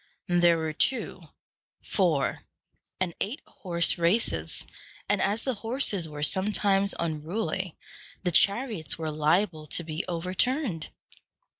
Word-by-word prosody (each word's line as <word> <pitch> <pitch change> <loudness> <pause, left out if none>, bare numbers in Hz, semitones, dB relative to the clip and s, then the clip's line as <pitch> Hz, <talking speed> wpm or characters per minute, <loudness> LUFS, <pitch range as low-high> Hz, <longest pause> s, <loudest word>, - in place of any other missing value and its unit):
There 175 -2 +4
were 160 -1 -3
two, 260 - -1 0.5
four, 165 -8 0 0.5
and 180 -2 -1
eight 245 +10 -2
horse 170 -2 +1
races; 175 +7 0 0.4
and, 205 0 +1
as 210 +4 0
the 260 - -1
horses 225 - +1
were 150 -1 -6
sometimes 195 +2 +3
unruly, 170 +2 -3 0.5
the 180 - 0
chariots 200 - +2
were 160 -1 -3
liable 155 +1 0
to 170 - 0
be 160 +2 -4
overturned. 185 - -1
180 Hz, 115 wpm, -27 LUFS, 160-205 Hz, 0.5 s, There